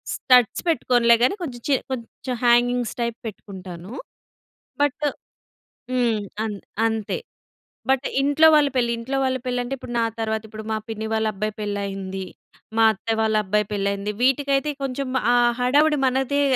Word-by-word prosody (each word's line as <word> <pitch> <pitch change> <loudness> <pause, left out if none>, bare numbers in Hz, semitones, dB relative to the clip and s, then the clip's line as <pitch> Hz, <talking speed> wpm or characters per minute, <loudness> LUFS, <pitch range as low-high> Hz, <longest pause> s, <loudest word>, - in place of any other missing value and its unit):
Studs 250 -4 +4
పెట్టుకోనులే 240 -5 +4
కానీ 260 - +3
కొంచెం 245 -6 -6
చి 285 - +3 0.2
కొంచెం 250 0 -5
హ్యాంగింగ్స్ 240 0 +3
టైప్ 235 -1 -2
పెట్టుకుంటాను. 190 -1 -9 0.9
బట్. 290 +1 +1 0.9
హ్మ్. 240 -4 +1 0.2
అం 220 -1 -2 0.3
అంతే. 220 - -2 0.7
బట్ 265 0 +2 0.2
ఇంట్లో 290 +3 +4
వాళ్ళ 295 -2 +5
పెళ్ళి 240 -2 +2
ఇంట్లో 255 +4 -3
వాళ్ళ 260 -1 0
పెళ్లంటే 245 +1 -1
ఇప్పుడు 250 -2 -9
నా 230 - +2 0.2
తరువాత 220 -1 -1
ఇప్పుడు 215 0 -8
మా 220 - 0
పిన్ని 220 0 -4
వాళ్ళబ్బాయి 215 -1 -1
పెళ్ళయింది. 195 -2 -4 0.5
మా 225 - +5
అత్త 225 +2 -3
వాళ్ళ 220 0 +1
అబ్బాయి 210 +1 +1
పెళ్ళయింది. 200 0 -1
వీటికైతే 275 +2 +2
కొంచెం 270 0 -3 0.2
ఆ - - +4 0.3
హడావుడి 295 +5 +3
మనదే 265 +2 +1
235 Hz, 140 wpm, -23 LUFS, 215-265 Hz, 0.9 s, వాళ్ళ